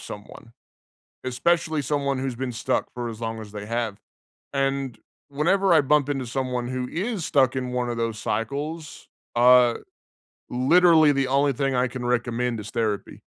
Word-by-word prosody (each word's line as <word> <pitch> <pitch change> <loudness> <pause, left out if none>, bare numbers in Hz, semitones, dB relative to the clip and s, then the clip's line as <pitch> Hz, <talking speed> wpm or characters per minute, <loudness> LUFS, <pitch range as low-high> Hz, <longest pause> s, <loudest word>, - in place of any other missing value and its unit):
someone, 105 +2 -10 0.7
especially 155 +4 +1
someone 140 -1 -1
who's 130 -2 -3
been 125 +1 -3
stuck 115 - -1
for 120 -1 -4
as 110 - -8
long 115 -1 -4
as 105 -2 -10
they 105 -1 -7
have. 115 -2 -2 0.6
And, 135 -2 -1 0.3
whenever 185 +7 +2
I 155 - +6
bump 145 0 +2
into 135 -3 -2
someone 125 0 -2
who 125 0 -3
is 195 - -3
stuck 135 -6 +3
in 125 -1 -3
one 125 -1 -1
of 120 - -3
those 115 -2 -2
cycles, 145 +10 -4 0.3
uh, 125 0 +6 0.8
literally, 155 +4 +5
the 135 -2 +1
only 140 +1 +2
thing 135 +1 -1
I 125 +1 +2
can 125 -1 -6
recommend 120 -1 -1
is 105 - -8
therapy. 110 -3 -2
130 Hz, 160 wpm, -24 LUFS, 120-145 Hz, 0.8 s, I